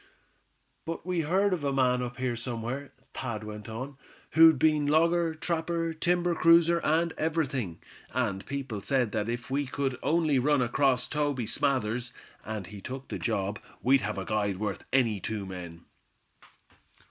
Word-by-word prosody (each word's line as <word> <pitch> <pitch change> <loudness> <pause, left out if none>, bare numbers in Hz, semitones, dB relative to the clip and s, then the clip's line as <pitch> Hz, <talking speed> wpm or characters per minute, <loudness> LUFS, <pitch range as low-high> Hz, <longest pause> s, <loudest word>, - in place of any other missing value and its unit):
"But 165 +1 -5
we 180 -1 -1
heard 185 +5 +2
of 170 -5 -2
a 140 - +1
man 125 -2 +2
up 125 0 -5
here 130 -2 -1
somewhere," 120 +3 -4 0.2
Thad 115 -5 -4
went 105 0 -8
on, 130 +5 -6 0.3
"who'd 160 -1 +7
been 150 +1 +3
logger, 165 +2 +3
trapper, 165 0 -1
timber 175 +2 +1
cruiser 170 +1 +5
and 165 +2 +2
everything; 140 - -1 0.3
and 105 -5 -1
people 135 -7 -4
said 125 -1 +1
that 105 +1 -1
if 120 +2 -4
we 140 +1 0
could 135 -1 -2
only 155 -4 +2
run 145 0 +3
across 125 +1 +2
Toby 145 -5 -1
Smathers, 125 -1 0 0.3
and 110 -3 -5
he 100 +1 -10
took 130 +5 -7
the - - -4
job, 105 -2 -1 0.2
we'd 135 +1 +5
have 105 -1 -3
a 95 - -3
guide 100 -3 0
worth 105 -1 -3
any 115 -6 +2
two 105 0 -4
men." 90 -3 -8
130 Hz, 160 wpm, -29 LUFS, 110-155 Hz, 0.3 s, who'd